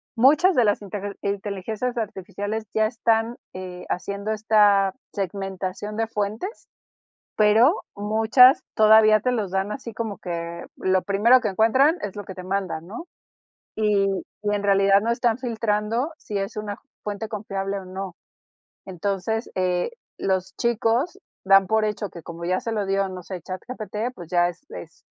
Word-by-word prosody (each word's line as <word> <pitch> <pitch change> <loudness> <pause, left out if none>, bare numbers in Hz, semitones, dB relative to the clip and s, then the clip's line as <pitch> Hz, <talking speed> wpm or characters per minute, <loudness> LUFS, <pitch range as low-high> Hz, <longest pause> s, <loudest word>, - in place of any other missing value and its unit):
Muchas 295 +10 +5
de 245 - +5
las 205 0 +1
inter 200 0 -5
inteligencias 205 +4 -3
artificiales 205 0 -4
ya 220 0 +3
están, 225 +1 +1 0.2
eh, 185 -1 -7
haciendo 200 +3 -3
esta 205 -3 +4 0.2
segmentación 195 +1 -4
de 225 0 0
fuentes, 220 - -4 0.7
pero 220 - +5
muchas 220 +5 +5
todavía 215 0 +6
te 250 +4 0
los 215 -6 -1
dan 190 +2 -1
así 230 0 -7
como 220 -2 -4
que 170 -1 -5
lo 185 0 +1
primero 220 +6 +4
que 220 - -1
encuentran 260 - +4
es 205 -1 -5
lo 205 - -5
que 190 - -8
te 185 - -8
mandan, 185 -3 -3
¿no? 235 - -8 0.7
Y 210 -2 +2 0.4
y 205 0 0
en 205 - -1
realidad 195 0 +4
no 225 +3 -1
están 235 -1 +1
filtrando 230 +3 -1
si 205 - -4
es 195 +2 -4
una 210 -1 -4 0.2
fuente 210 +1 -4
confiable 200 -2 -3
o - - -11
no. 185 0 -6 0.7
Entonces, 195 +4 -2
eh, 180 -1 0 0.3
los 190 -1 -1
chicos 235 - 0 0.3
dan 195 0 +6
por 220 +2 +2
hecho 210 -1 -3
que, 170 - -10
como 170 +1 -8
ya 185 +2 0
se 230 - -4
lo 210 -2 -1
dio, 195 0 +1
no 185 -1 -7
sé, 180 +1 -7
ChatGPT, 215 +5 -5
pues 175 -7 -10
ya 175 -1 +3
es 175 +10 -10
es - - -10
205 Hz, 160 wpm, -24 LUFS, 195-225 Hz, 0.7 s, todavía